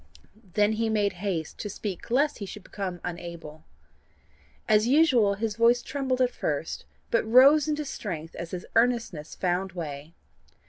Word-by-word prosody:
Then 210 0 +4
he 225 +1 0
made 205 -2 +1
haste 175 -6 -3
to 210 - -4
speak 200 -1 -6
lest 280 +4 +2
he 200 - -5
should 205 +1 -9
become 190 -4 -5
unable. 170 -3 -7 1.0
As 215 0 +4
usual 255 -8 +4
his 215 +1 -2
voice 235 +1 +4
trembled 265 -2 -2
at 250 -1 +3
first, - - -3 0.3
but 230 - +3
rose 270 +7 +6
into 300 0 -1
strength 170 - -6
as 170 - -6
his 180 0 -6
earnestness 230 -10 +1
found 180 +1 -1
way. 155 -2 -7
210 Hz, 150 wpm, -27 LUFS, 175-245 Hz, 1.0 s, rose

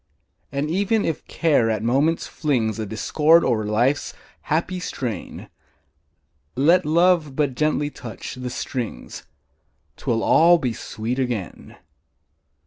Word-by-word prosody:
And 140 +2 -2
even 205 +4 +1
if 160 - -3
Care 145 -9 +2
at 110 -1 -1
moments 140 +8 +1
flings 120 -8 -1
A 110 - -3
discord 155 +10 +3
o'er 110 -4 0
life's 120 +7 0 0.3
happy 170 +4 0
strain, 120 - -5 1.1
Let 165 +6 +3
Love 165 -3 +3
but 145 -3 0
gently 150 +1 0
touch 115 -5 -8
the 125 0 -6
strings, 120 - -6 0.7
'Twill 115 -1 -1
all 170 +2 +6
be 125 -7 -2
sweet 115 +3 -4
again! 120 - -4
140 Hz, 120 wpm, -22 LUFS, 115-160 Hz, 1.1 s, all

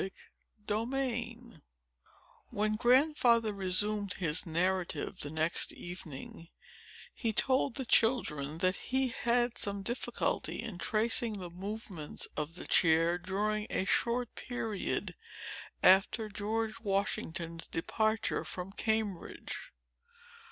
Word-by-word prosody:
Chapter 225 +5 -1
X 240 -3 -1 1.1
When 215 +1 0
Grandfather 240 -2 +4
resumed 200 +1 0
his 165 -1 0
narrative, 175 -1 0
the 145 - -2
next 160 +2 +1
evening, 165 -2 -8 0.7
he 230 - -1
told 260 +3 +2
the 265 - -3
children 160 - +2
that 185 +2 +2
he 265 0 0
had 240 0 +1
some 200 -1 +1
difficulty 240 +6 -1
in 195 -6 -5
tracing 225 +2 +2
the 180 -3 -7
movements 190 -4 -4
of 155 +2 -3
the - - -6
chair, 165 +1 +4
during 210 +3 -1
a 190 - 0
short 235 +3 +1
period 225 -5 -3 0.7
after 200 +4 +5
General 215 +2 -1
Washington's 170 -5 -1
departure 220 +6 0
from 180 +1 -6
Cambridge. 220 - -2
210 Hz, 105 wpm, -32 LUFS, 180-230 Hz, 1.1 s, after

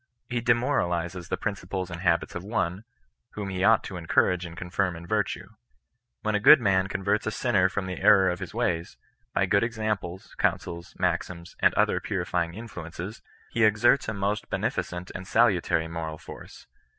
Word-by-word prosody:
He 120 -1 -1
demoralizes 90 - 0
the - - -1
principles 95 -3 -4
and 85 -1 -6
habits 85 -2 +1
of 90 - -5
one, 100 -1 -2 0.5
whom 100 -2 -4
he 95 0 -2
ought 110 +2 +5
to 95 - -6
encourage 90 +1 +1
and 85 0 -11
confirm 90 0 -1
in 85 +1 -9
virtue. 105 +3 -1 0.7
When 110 - 0
a 105 - +2
good 105 - +9
man 95 -4 +2
converts 100 +2 -1
a - - +3
smner 105 -4 +2
from 100 0 -3
the 95 -1 -5
error 95 -2 +6
of 90 - -4
his - - -6
ways, 85 0 -2 0.4
by - - +3
good 100 - +3
examples, 110 -6 -3
counsels, 85 0 -1
maxims, 85 -1 -2
and - - +5
other - - +2
purifying 85 -1 -2
influences, 100 -2 -7 0.3
he 115 - +1
exerts 110 +4 +4
a - - -2
most 100 +2 -2
henefir - - 0 0.2
cervt 90 - -12
and 95 - -7
salutary 80 0 +2
moral 80 -1 -5
force. - - -12
95 Hz, 175 wpm, -27 LUFS, 85-105 Hz, 0.7 s, good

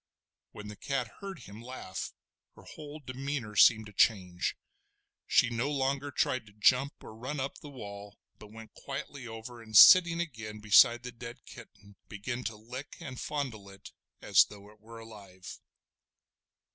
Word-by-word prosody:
When 105 0 -10
the 105 - -8
cat 130 +1 -2
heard 195 -5 -8
him 105 +1 -11
laugh, 120 -6 -7 0.4
her - - -16
whole 150 0 -10
demeanour 130 -4 -5
seemed 110 +2 +6
to 105 - -13
change. 90 -4 +1 0.7
She 120 - +3
no 120 +4 -1
longer 140 0 -1
tried 130 -3 -1
to 100 - -17
jump 125 +6 +2
or - - -10
run 130 +6 -5
up 135 +1 -4
the 150 - -11
wall, 100 -5 -10 0.2
but 105 -1 -13
went 110 0 -12
quietly 135 -1 -7
over, 115 +1 -9
and 110 -1 +1
sitting 170 - +9
again 110 -10 -5
beside 120 +3 +5
the 125 - -6
dead 120 +1 -10
kitten 105 -4 -15
began 120 +4 -5
to 110 - -3
lick 125 +6 -9
and 135 -7 -8
fondle 125 -9 -4
it 95 0 -13 0.3
as - - +6
though 105 0 -14
it 105 - -22
were 115 +2 -13
alive. 100 -5 -11
115 Hz, 160 wpm, -30 LUFS, 105-135 Hz, 0.7 s, sitting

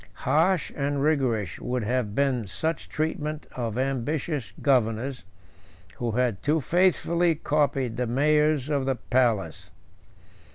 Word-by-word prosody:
Harsh 160 +5 +2
and 140 0 -1
rigorous 130 - 0
would 125 -1 -2
have 115 -2 -1
been 130 -6 +1
such 160 - -3
treatment 155 -1 -3
of 115 -3 -3
ambitious 135 +1 -2
governors, 125 -2 +1 0.7
who 120 - -2
had 120 -4 0
too 155 +2 +2
faithfully 170 +1 +2
copied 140 -6 0
the 125 -1 -1
mayors 150 +2 +2
of 140 -3 0
the 135 - +1
palace. 115 -8 0
135 Hz, 120 wpm, -26 LUFS, 120-150 Hz, 0.7 s, Harsh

